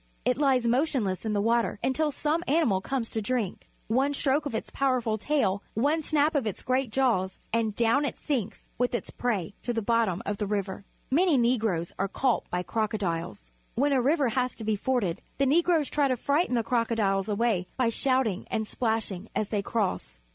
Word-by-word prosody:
It 250 +1 +1
lies 265 -4 +3
motionless 235 - 0
in 215 - 0
the 205 - +1
water 230 +1 +1
until 300 +4 +1
some 305 +4 -1
animal 275 - +2
comes 255 +2 -2
to 220 - -2
drink. 215 -3 -2 0.2
One 270 +5 +1
stroke 285 +2 +1
of 230 - -4
its - - -4
powerful 250 -5 0
tail, 205 -8 +1
one 290 +8 +2
snap 305 0 +2
of 275 -7 0
its 205 - -4
great 255 0 0
jaws, 215 -8 +1 0.2
and 225 -2 +1
down 235 +6 +3
it - - -3
sinks 235 -8 -3
with 245 0 +1
its - - -4
prey 205 -7 -2
to 240 - -2
the 225 - -1
bottom 225 -5 +1
of 205 -1 -3
the 205 - -1
river. 195 -1 -3 0.3
IMany 320 -1 +4
Negroes 220 -8 +1
are 195 - +1
caught 250 +5 0
by 180 0 -1
crocodiles. 180 - -3 0.2
When 280 +4 +2
a 260 - +3
river 280 0 +2
has 250 +1 -1
to 225 - -8
be 215 0 +1
forded, 205 -6 -1 0.2
the 275 - +2
Negroes 325 +1 +3
try 290 -1 +2
to 255 -2 0
frighten 285 +2 +1
the 230 - +1
crocodiles 220 -4 +1
away 205 -4 +1
by 250 -3 +2
shouting 250 -5 0
and 220 - -1
splash 225 -1 -1
ing 190 +3 -7
as 210 - -1
they 210 -2 0
cross. 185 - -2
235 Hz, 195 wpm, -27 LUFS, 205-270 Hz, 0.3 s, IMany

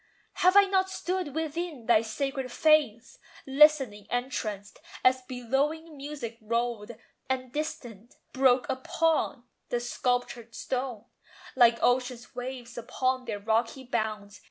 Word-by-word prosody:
Have 365 +2 +5
I 405 - +10
not 380 -1 +1
stood 365 -5 -3
within 320 -4 -3
thy 225 -2 +5
sacred 265 +3 -3
fanes, 290 -7 +2 0.3
Listening 270 -7 +4
entranced, 215 -5 -3 0.2
as 255 0 +4
billowing 270 +6 -2
music 275 -5 -7
rolled, 235 0 -2 0.4
And 255 -1 -2
distant, 240 -7 -5 0.2
broke 260 -1 +3
upon 320 -2 0 0.3
the 240 - 0
sculptured 240 -1 -2
stone 250 -4 -3 0.5
Like 235 -2 +6
ocean's 245 -1 0
waves 245 -1 -6
upon 255 +2 -1
their 220 -3 -3
rocky 225 +5 0
bounds? 215 -4 -3
255 Hz, 115 wpm, -28 LUFS, 235-290 Hz, 0.5 s, I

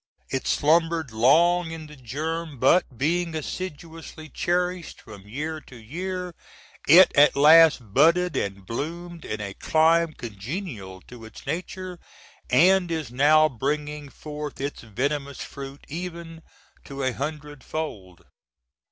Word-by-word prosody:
It 135 - -2
slumbered 165 -2 +2
long 165 +10 +4
in 160 -1 -7
the 150 0 -12
germ, 155 +4 -5
but 130 0 +3
being 165 +4 0
assiduously 160 -1 -7
cherished 180 +3 -2
from 105 -2 -13
year 155 +7 -4
to 125 - -13
year 180 +10 -5 0.5
it 175 +6 +8
at 145 +1 +6
last 150 -6 +6
budded 170 +6 +4
and 100 -1 -3
bloomed 170 - -6
in 105 - -4
a 100 -1 -5
clime 160 +5 +2
congenial 105 - -7
to 120 +3 -13
its 110 0 -12
nature, 180 +1 -5 0.3
& - - -32
is 170 -6 +3
now 150 +4 +5
bringing 145 +2 -3
forth 150 0 -7
its 140 +1 -4
venomous 140 +5 -3
fruit, 140 0 -9
even 165 0 -7 0.4
to 140 -1 -6
a 130 - +1
"hundred 150 0 -6
fold." 100 - -6
150 Hz, 125 wpm, -25 LUFS, 130-170 Hz, 0.5 s, it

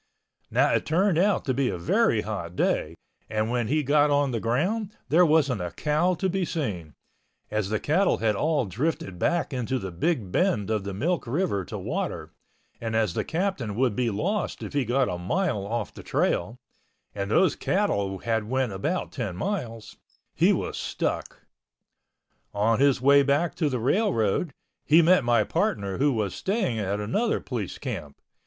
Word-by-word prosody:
Now - - +3
it - - 0
turned 175 +1 +2
out 200 +2 +2
to 130 - +1
be 130 0 +1
a 95 - -3
very 115 - +2
hot 100 -5 -5
day 80 -2 0 0.3
and 110 +1 -1
when 120 -2 0
he 150 +4 +1
got 145 +2 +3
on 145 -1 +2
the 115 - -1
ground, 185 - -1
there 170 +5 +5
wasn't 140 - +2
a 90 - -3
cow 155 - +1
to 190 - -1
be 190 +1 -1
seen, 105 - -4 0.6
as 105 -2 -1
the 110 0 0
cattle 185 +6 +2
had 110 -2 +1
all 150 +1 +1
drifted 100 - -3
back 170 - 0
into 125 +1 -1
the 95 -6 -5
big 105 - -1
bend 110 - +1
of 105 -3 -1
the 100 - -4
Milk 165 - -1
River 135 - 0
to - - -6
water - - -4 0.5
and 115 -1 -3
as 110 -6 +1
the - - -1
Captain 160 - -2
would 125 -2 +1
be 125 -2 +1
lost 185 - -2
if - - -7
he 140 -3 +1
got 125 +3 +2
a 90 - -3
mile 105 - -1
off 115 -1 -3
the - - -10
trail 100 +8 -1 0.6
(and 100 -1 -3
those 175 - +3
cattle 100 - 0
had 110 +1 -1
went 130 -2 0
about 155 - -2
10 110 -9 -4
miles) 115 - -4 0.4
he - - +4
was - - -2
stuck. - - -3 1.1
On 110 +3 +2
his 140 -2 +3
way 140 +2 +6
back 140 +3 +1
to 155 -4 0
the 130 - -1
railroad, 135 - +1 0.3
he 160 +3 +5
met 180 -1 +5
my 120 -2 +3
partner 100 -1 -1
who 145 +1 +3
was 105 -6 -1
staying 190 - -1
at 100 0 -1
another 205 - 0
police 115 -8 -5
camp. 70 -1 -6
125 Hz, 180 wpm, -26 LUFS, 105-160 Hz, 1.1 s, way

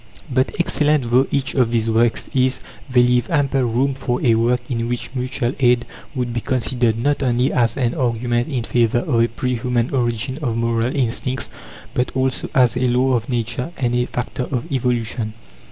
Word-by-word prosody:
But 130 0 +1
excellent 150 -6 +1
though 130 +3 +4
each 140 -1 -1
of 125 -4 +2
these 115 -1 0
works 115 +1 +2
is, 130 0 +2 0.3
they 125 -1 +5
leave 125 0 +2
ample 140 -4 +1
room 125 +3 +1
for 125 -2 -2
a 115 - +5
work 120 +2 +2
in 115 -2 -2
which 120 +1 -4
Mutual 125 -1 -2
Aid 125 -2 +3 0.3
would 125 -2 -2
be 120 - -2
considered, 120 -2 0
not 145 +4 0
only 125 0 +1
as 120 -2 +1
an 120 -3 +1
argument 120 -1 0
in 130 -6 -2
favour 120 +2 +1
of 120 -6 +2
a 115 - +4
pre 125 +2 -2
human 120 0 0
origin 120 +1 -1
of 120 -5 -1
moral 115 +2 0
instincts, 130 0 -1 0.4
but 125 - 0
also 130 0 -1
as 125 -2 +4
a 125 +1 +1
law 125 +2 +2
of 115 -1 -1
Nature 120 +2 -2
and 120 -2 0
a 125 0 +1
factor 125 +1 -3
of 125 -3 -1
evolution. 120 -4 -1
125 Hz, 185 wpm, -20 LUFS, 120-130 Hz, 0.4 s, they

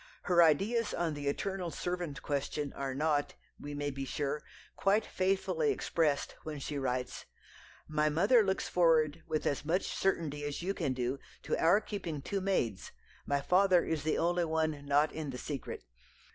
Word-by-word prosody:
Her 175 -2 +4
ideas 205 +9 +3
on 170 -2 0
the 145 -1 -5
eternal 185 +4 -2
servant 175 -4 -4
question 145 0 -2
are 135 -1 -3
not, 150 0 +1 0.2
we 145 0 -6
may 145 0 -2
be 135 0 -5
sure, 145 +2 -2 0.3
quite 205 +2 +2
faithfully 195 - 0
expressed 160 - 0
when 155 -1 -6
she 140 +1 -4
writes: 125 -1 -2 0.6
"My 155 0 +2
mother 200 +11 +5
looks 190 -2 0
forward 165 -2 +3
with 155 -1 -1
as 140 - 0
much 165 +5 +1
certainty 160 -6 0
as 145 +3 -3
you 195 +2 0
can 155 -9 -1
do 130 +2 -2 0.2
to - - 0
our 170 +6 +6
keeping 170 -10 -5
two 195 +4 -2
maids; 120 - -1 0.4
my 140 0 +1
father 180 +3 +4
is 160 -2 -1
the 155 +1 0
only 175 +1 +2
one 155 -2 -1
not 145 +2 +3
in 155 -2 -5
the 125 - -5
secret. 140 +2 -5
155 Hz, 170 wpm, -32 LUFS, 145-180 Hz, 0.6 s, our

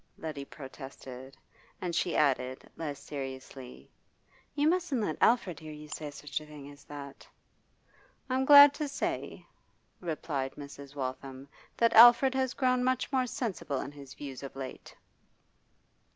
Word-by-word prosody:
Letty 150 -3 -6
protested. 135 -2 -10 0.4
And 175 -2 -3
she 170 - 0
added, 130 -3 +1
less 145 -4 -5
seriously, 135 -2 -8 0.6
'You 295 +1 +2
mustn't 340 -6 +1
let 180 -8 -1
Alfred 225 -7 +3
hear 155 -1 -9
you 150 0 -10
say 150 -1 -5
such 145 0 -5
a - - -11
thing 145 -2 -10
as 145 0 -16
that.' 140 -1 -10 1.0
'I'm 260 0 +1
glad 285 0 +10
to 300 0 -3
say,' 280 - -4 0.5
replied 150 -5 -3
Mrs. 140 -1 -10
Waltham, 135 0 -5 0.3
'that 230 0 +3
Alfred 240 +3 +8
has 260 -1 -1
grown 255 -2 +2
much 255 +2 0
more 260 -2 +1
sensible 220 - -3
in 140 - -5
his 140 -2 -12
views 135 -3 -8
of 135 -1 -8
late. 135 -1 -8
150 Hz, 140 wpm, -30 LUFS, -, 1.0 s, glad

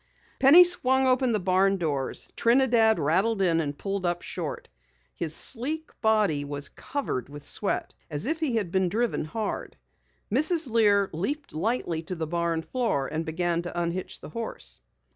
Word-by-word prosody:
Penny 280 +7 +9
swung 265 -7 +4
open 255 -1 +2
the 215 - +1
barn 190 +1 +2
doors. 145 -6 -2
Trinidad 235 -2 +4
rattled 195 +9 +1
in 170 -4 +2
and 145 -3 -3
pulled 195 +1 -3
up 175 -1 -1
short. - - -5 0.5
His 160 -2 -3
sleek 300 +6 -1
body 210 -10 +2
was 145 0 -4
covered 265 - -4
with 145 0 -10
sweat 200 - -3 0.2
as 150 +4 -4
if 315 +4 -1
he 295 -7 -1
had 200 -6 -1
been 190 -1 +1
driven 230 -3 -1
hard. 215 +7 -4 0.5
Mrs. 310 - +3
Lear 205 -3 +3
leaped 280 - -4
lightly 170 -2 -1
to 175 +3 -6
the 160 -1 -3
barn 170 0 -1
floor 195 - -1
and 160 +2 -3
began 170 +1 0
to 175 0 -5
unhitch 175 +2 -3
the - - -9
horse. 230 +7 -5
195 Hz, 160 wpm, -26 LUFS, 165-240 Hz, 0.5 s, Penny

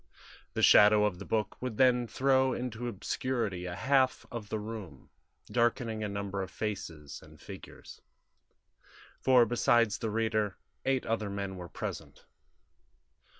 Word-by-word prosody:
The - - 0
shadow 105 0 +7
of 95 -4 -2
the 100 - -7
book 105 -2 -2
would 125 -4 -4
then 125 -2 +4
throw 130 +1 +2
into 120 -1 -4
obscurity 110 -4 -2
a 90 - -5
half 130 +6 +2
of 115 -4 -6
the 110 - -1
room, 105 -9 -8 0.4
darkening 115 -2 0
a 105 - -2
number 100 -1 -3
of 95 - -5
faces 80 -10 -5
and - - -16
figures; - - -11 1.2
for 125 -2 +5
besides 115 -2 +2
the 115 - -2
reader, 110 -2 0 0.3
eight 135 -1 +1
other 110 -2 -1
men 100 -1 -4
were 90 -2 -8
present. - - -7
110 Hz, 140 wpm, -30 LUFS, 100-120 Hz, 1.2 s, shadow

